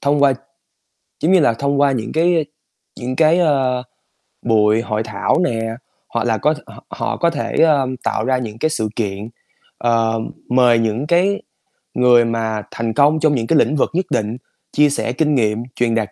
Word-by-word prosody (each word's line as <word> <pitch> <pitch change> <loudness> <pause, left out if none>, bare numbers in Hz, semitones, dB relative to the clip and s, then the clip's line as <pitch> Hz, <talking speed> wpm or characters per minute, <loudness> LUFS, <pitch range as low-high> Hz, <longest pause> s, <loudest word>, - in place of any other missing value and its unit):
thông 145 0 +1
qua 140 -1 +5 0.9
giống 165 - +1
như 190 - +6
là, 145 -7 +3
thông 140 +4 -1
qua 140 -1 +4
những 120 -4 -3
cái, 170 +2 +2
ơ, 160 - +2 0.6
những 125 +1 -4
cái, 160 +2 +4
ờ, 135 -6 +1 0.6
buổi 110 -1 +2
hội 110 -1 -2
thảo 105 -3 -1
nè, 115 -8 -1 0.5
hoặc - - -2
là - - +1
có - - +1
họ - - -14
họ - - -3
có 170 - +2
thể, 150 -3 -4
ơ, 145 -5 +3 0.2
tạo 110 - -1
ra 130 0 +1
những 115 -4 -6
cái 155 - +1
sự 110 -9 -2
kiện, 105 -1 -3 0.5
ờ, 115 -1 +1 0.3
mời 125 -2 +4
những 115 +5 -1
cái 185 +5 +2 0.5
người 125 -1 +4
mà 110 -2 -2
thành 115 -1 -3
công 145 +3 +3
trong 155 -2 +2
những 115 -3 -2
cái 160 - +3
lĩnh 150 - +2
vực 140 - +1
nhất 185 +2 0
định 110 +2 -1 0.3
chia 150 0 +4
sẻ 140 -4 -2
kinh 150 +2 +1
nghiệm, 110 -2 0
truyền 115 -2 0
đạt 110 -3 -1
125 Hz, 195 wpm, -18 LUFS, 115-150 Hz, 0.9 s, như